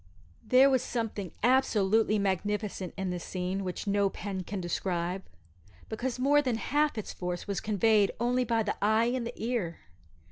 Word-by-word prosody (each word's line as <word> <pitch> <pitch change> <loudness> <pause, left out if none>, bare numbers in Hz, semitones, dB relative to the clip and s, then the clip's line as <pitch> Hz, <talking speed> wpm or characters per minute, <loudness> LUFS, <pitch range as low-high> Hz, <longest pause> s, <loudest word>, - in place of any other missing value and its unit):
There 255 +5 +6
was 260 -3 +3
something 215 -6 -3
absolutely 220 -4 +3
magnificent 200 -1 -2
in 190 -1 -2
this 175 -1 -4
scene 185 +1 -3
which 180 +2 -4
no 200 -1 +2
pen 195 0 -5
can 195 +2 -5
describe, 175 +1 -2 0.7
because 240 +3 -3
more 285 +3 +4
than 255 -5 0
half 295 +3 +1
its 215 - -4
force 180 -1 -4
was 200 -2 -1
conveyed 210 -1 +3
only 245 +2 +2
by 230 -2 +1
the 210 - -2
eye 220 +3 +3
and 250 -2 -2
the 240 - -6
ear. 220 -8 -2
210 Hz, 165 wpm, -29 LUFS, 190-240 Hz, 0.7 s, There